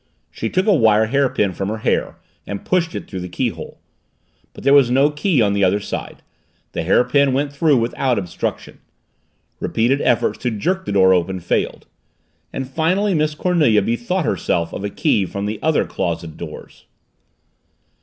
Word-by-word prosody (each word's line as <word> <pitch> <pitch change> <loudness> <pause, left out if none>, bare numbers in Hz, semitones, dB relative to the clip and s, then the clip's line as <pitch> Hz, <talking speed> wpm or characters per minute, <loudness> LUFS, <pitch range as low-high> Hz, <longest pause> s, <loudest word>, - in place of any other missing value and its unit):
She - - -4
took 185 0 0
a 215 - +4
wire 110 - +4
hairpin 120 -6 +1
from 95 +2 -3
her 110 - -3
hair 110 - -1 0.3
and 100 - -6
pushed 175 -3 0
it - - -6
through 95 - -6
the 90 0 -6
keyhole. 85 - -4 0.7
But - - -13
there 140 +1 +4
was 140 -4 +6
no 135 +4 +3
key 150 - +1
on 100 -1 +1
the 100 -1 +1
other 95 +2 +3
side; - - -6 0.5
the - - -3
hairpin 125 - +3
went 140 +2 -1
through 145 -1 +3
without 120 +2 0
obstruction. 95 -3 -4 0.8
Repeated 125 +5 +1
efforts 120 -2 +1
to 125 - -1
jerk 185 - -2
the - - -3
door 95 -1 +5
open 95 +1 0
failed. 85 - -2 0.7
And 135 - -4
finally 180 +9 +1
Miss 155 -2 0
Cornelia 150 - +2
bethought 120 - -1
herself 85 - -1
of - - -5
a 100 - -2
key 100 -1 +1
from 100 +3 -4
the 105 +1 -3
other 160 0 +2
closet 85 -2 -4
doors. - - -10
120 Hz, 170 wpm, -19 LUFS, 100-150 Hz, 0.8 s, was